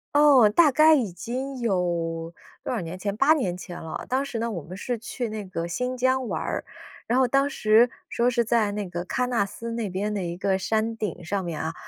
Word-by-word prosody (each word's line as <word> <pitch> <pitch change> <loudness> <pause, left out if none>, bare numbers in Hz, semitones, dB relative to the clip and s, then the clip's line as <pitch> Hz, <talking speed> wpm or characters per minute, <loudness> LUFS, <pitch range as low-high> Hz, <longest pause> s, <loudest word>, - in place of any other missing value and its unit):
哦， 285 -7 +7
大 300 +7 +5
概 310 +3 +6
已 235 -10 0
经 260 +7 -5
有 170 -6 -1 0.3
多 - - -2
少 230 - -1
年 170 +2 -6
前， 200 +2 -3
8 275 +8 +5
年 220 - -1
前 175 -1 -8
了。 160 - -6
当 265 +2 +1
时 240 -4 -4
呢， 230 +1 -1
我 175 -8 -5
们 180 +5 -9
是 240 +5 -3
去 240 +1 -4
那 215 -1 -5
个 170 -3 -4
新 250 +8 -2
疆 260 0 +1
玩 - - -2
儿， - - -3 0.4
然 245 +3 +2
后 260 - +4
当 275 +3 +2
时 225 -3 +4 0.2
说 235 - +1
是 240 -1 +2
在 225 -2 +2
那 205 -2 -4
个 175 0 -4
喀 250 +7 -1
纳 235 -5 +1
斯 230 +4 -7
那 230 -2 -2
边 195 +3 -2
的 200 -3 -2
一 170 -1 -4
个 190 +1 0
山 220 +3 -1
顶 205 -5 -4
上 190 +3 -2
面 165 -3 -4
啊， 160 +1 -3
220 Hz, 240 characters per minute, -25 LUFS, 185-250 Hz, 0.4 s, 哦